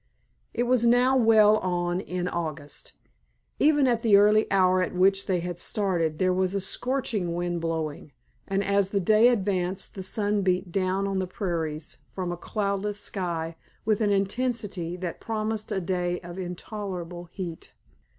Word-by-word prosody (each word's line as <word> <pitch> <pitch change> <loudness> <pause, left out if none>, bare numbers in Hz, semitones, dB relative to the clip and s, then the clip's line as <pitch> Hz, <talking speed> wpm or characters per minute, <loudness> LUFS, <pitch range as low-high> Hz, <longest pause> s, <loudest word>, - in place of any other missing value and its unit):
It 240 - 0
was 245 -1 +2
now 245 +2 +4
well 220 -3 +6
on 175 -2 -1
in 180 -2 -3
August. 155 -4 -5 0.7
Even 295 -2 +4
at 240 -3 +2
the 215 -4 +6
early 210 +2 +4
hour 185 -1 +4
at 185 - -2
which 195 +2 +3
they 180 -3 +1
had 175 0 -5
started 175 -7 0
there 185 +1 +2
was 185 +1 0
a - - +1
scorching 210 -4 -1
wind 175 -1 -2
blowing, 160 -3 -3 0.4
and 195 +1 0
as 200 -1 +2
the 200 - 0
day 215 +5 +5
advanced 190 -5 0
the 195 - -6
sun 205 +1 0
beat 185 -1 0
down 190 +1 0
on 195 -1 -1
the 185 - -2
prairies 165 -5 -3
from 185 -2 -4
a - - -2
cloudless 200 +2 -2
sky 170 -5 -2 0.3
with 215 0 +1
an 205 -1 +2
intensity 200 -4 -1
that 180 -2 -5
promised 215 -1 -3
a - - 0
day 180 -1 -1
of 175 +1 -8
intolerable 180 -1 -6
heat. 170 -1 -7
190 Hz, 160 wpm, -26 LUFS, 175-210 Hz, 0.7 s, well